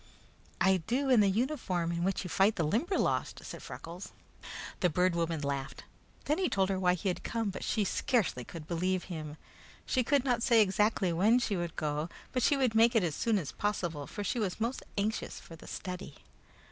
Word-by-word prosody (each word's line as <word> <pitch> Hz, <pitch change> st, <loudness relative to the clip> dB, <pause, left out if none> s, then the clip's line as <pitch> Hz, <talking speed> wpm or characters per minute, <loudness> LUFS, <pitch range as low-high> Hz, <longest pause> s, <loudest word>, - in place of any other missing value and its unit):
"I 190 Hz, 0 st, +4 dB
do 265 Hz, +3 st, +1 dB
in 245 Hz, -, +7 dB
the 205 Hz, -1 st, +5 dB
uniform 195 Hz, -, 0 dB
in 170 Hz, 0 st, -1 dB
which 195 Hz, +2 st, 0 dB
you -, -, -5 dB
fight 200 Hz, +3 st, +4 dB
the 170 Hz, -, 0 dB
Limberlost," 250 Hz, -, 0 dB
said -, -, -7 dB
Freckles. 170 Hz, +3 st, -8 dB, 0.7 s
The 180 Hz, -, +3 dB
Bird 180 Hz, +2 st, +2 dB
Woman 165 Hz, -2 st, -1 dB
laughed. 140 Hz, -2 st, -3 dB, 0.4 s
Then 300 Hz, +4 st, +1 dB
he 370 Hz, -, +1 dB
told 195 Hz, -1 st, +1 dB
her 190 Hz, -1 st, 0 dB
why 180 Hz, -1 st, +3 dB
he 190 Hz, +3 st, -4 dB
had 180 Hz, -, -2 dB
come, 225 Hz, -3 st, -2 dB
but -, -, -6 dB
she 215 Hz, -, +1 dB
scarcely 200 Hz, -, 0 dB
could 160 Hz, +4 st, -9 dB
believe 180 Hz, +2 st, 0 dB
him. 155 Hz, -4 st, -6 dB, 0.5 s
She 255 Hz, -, +1 dB
could 280 Hz, +1 st, +2 dB
not 245 Hz, -3 st, +1 dB
say 230 Hz, -1 st, +5 dB
exactly 210 Hz, -2 st, +2 dB
when 210 Hz, +8 st, +4 dB
she 235 Hz, -5 st, 0 dB
would 175 Hz, -2 st, -3 dB
go, 150 Hz, +2 st, -2 dB, 0.2 s
but 255 Hz, -, 0 dB
she 285 Hz, -, +3 dB
would 255 Hz, -4 st, +2 dB
make 230 Hz, +2 st, +5 dB
it 220 Hz, -, +4 dB
as 165 Hz, -4 st, 0 dB
soon 225 Hz, +7 st, +1 dB
as 165 Hz, -8 st, -3 dB
possible, 175 Hz, -8 st, -2 dB
for 205 Hz, -, -5 dB
she 220 Hz, +5 st, -1 dB
was 200 Hz, -3 st, -2 dB
most 235 Hz, +4 st, -1 dB, 0.2 s
anxious 215 Hz, +2 st, -2 dB
for 165 Hz, -, -12 dB
the 160 Hz, -, -14 dB
study. 180 Hz, -1 st, -6 dB
195 Hz, 205 wpm, -31 LUFS, 170-230 Hz, 0.7 s, in